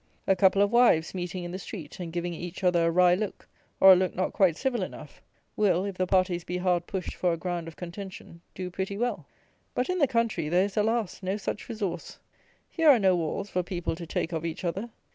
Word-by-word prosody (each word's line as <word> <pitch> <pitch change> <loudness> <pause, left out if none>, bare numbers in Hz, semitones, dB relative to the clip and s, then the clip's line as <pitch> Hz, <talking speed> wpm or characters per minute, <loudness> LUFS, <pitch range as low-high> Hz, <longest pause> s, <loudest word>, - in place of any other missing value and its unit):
A 195 - +3
couple 190 +2 +4
of 205 - +1
wives 235 -10 +4
meeting 180 0 -4
in 175 - -5
the 185 - -5
street, 175 -5 -8
and 170 -2 -5
giving 175 +1 -3
each 175 +3 -7
other 175 -2 +3
a - - +3
wry 180 +1 +5
look, 200 +2 -3 0.3
or 190 0 +10
a - - +6
look 185 -1 0
not 185 - -1
quite 180 -5 +3
civil 260 -5 -1
enough, 150 -5 -8 0.3
will, 195 -3 +2
if 200 -2 -4
the 185 0 -1
parties 185 -2 +2
be 180 - -3
hard 180 -1 0
pushed 190 -2 -4
for 180 -2 0
a - - -2
ground 175 -1 -3
of 165 - -9
contention, 180 -1 -9
do 180 -1 -5
pretty 195 +2 -3
well. 240 +2 -2 0.5
But 250 - 0
in 365 - -1
the 285 - +4
country, 230 -10 0
there 180 +3 +3
is, 200 - -6
alas! 220 -2 0
no 190 +2 -2
such 210 +2 -5
resource. 200 -7 -4 0.5
Here 325 -3 +3
are 275 - +8
no 190 -4 +3
walls 175 +4 -3
for 180 - +1
people 175 -2 -3
to 170 0 -8
take 165 - -2
of 165 -1 -3
each 165 +2 -4
other. 190 +7 -2
185 Hz, 230 wpm, -27 LUFS, 175-200 Hz, 0.5 s, or